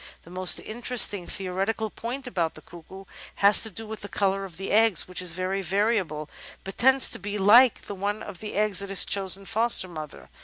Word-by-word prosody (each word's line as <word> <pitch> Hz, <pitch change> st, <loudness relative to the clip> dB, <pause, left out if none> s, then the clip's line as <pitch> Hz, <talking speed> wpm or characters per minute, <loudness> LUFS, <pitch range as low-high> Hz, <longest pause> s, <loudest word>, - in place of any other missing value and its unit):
The 170 Hz, -, -16 dB
most 185 Hz, 0 st, +2 dB
interesting 220 Hz, -5 st, +2 dB
theoretical 195 Hz, +3 st, -3 dB
point 250 Hz, +4 st, -6 dB
about 175 Hz, -10 st, -3 dB
the 155 Hz, -, -14 dB
Cuckoo 180 Hz, +3 st, -13 dB, 0.3 s
has 200 Hz, +1 st, +5 dB
to 220 Hz, -, +4 dB
do 220 Hz, +3 st, -7 dB
with 220 Hz, -1 st, -8 dB
the 205 Hz, -, -8 dB
colour 195 Hz, 0 st, -1 dB
of 180 Hz, -4 st, -13 dB
the 195 Hz, -, -6 dB
eggs, 220 Hz, -2 st, +3 dB
which 185 Hz, 0 st, -4 dB
is 180 Hz, -2 st, +1 dB
very 185 Hz, +2 st, -3 dB
variable, 190 Hz, -5 st, -1 dB, 0.4 s
but 195 Hz, -, -9 dB
tends 265 Hz, +2 st, +5 dB
to -, -, -2 dB
be 205 Hz, +2 st, -5 dB
like 225 Hz, +5 st, +5 dB
that 200 Hz, -2 st, -9 dB, 0.2 s
of 180 Hz, -, -10 dB
the 215 Hz, -, -7 dB
eggs 210 Hz, -2 st, 0 dB
of 200 Hz, -, -5 dB
the 195 Hz, -, -5 dB
chosen 195 Hz, 0 st, 0 dB
foster 225 Hz, -1 st, +1 dB
mother. 155 Hz, -4 st, -10 dB
195 Hz, 200 wpm, -25 LUFS, 185-220 Hz, 0.4 s, has